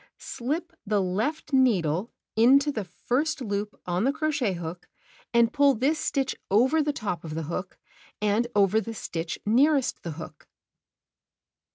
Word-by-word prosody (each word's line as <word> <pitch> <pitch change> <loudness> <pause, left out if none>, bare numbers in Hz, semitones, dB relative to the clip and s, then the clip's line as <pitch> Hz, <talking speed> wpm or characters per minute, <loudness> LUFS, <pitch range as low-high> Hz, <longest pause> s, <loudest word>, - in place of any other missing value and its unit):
Slip 315 +8 -4
the 210 -1 +1
left 220 +12 -2
needle 200 - +2 0.2
into 270 +6 +5
the 215 -7 -4
first 255 - -1
loop 205 -3 -3
on 180 +2 0
the 270 - +3
crochet 295 -8 0
hook 170 0 -7 0.4
and 235 -1 +3
pull 285 -2 +4
this 280 +7 +1
stitch 275 -2 -1
over 260 +10 +4
the 295 0 +1
top 210 -10 -4
of 155 -2 -6
the 165 - -2
hook, 175 +4 -5 0.4
and 210 +3 +1
over 205 +2 +4
the 225 +2 -6
stitch 165 -4 -4
nearest 270 +5 +3
the 170 - -5
hook. 160 +1 -10
225 Hz, 150 wpm, -26 LUFS, 185-275 Hz, 0.4 s, into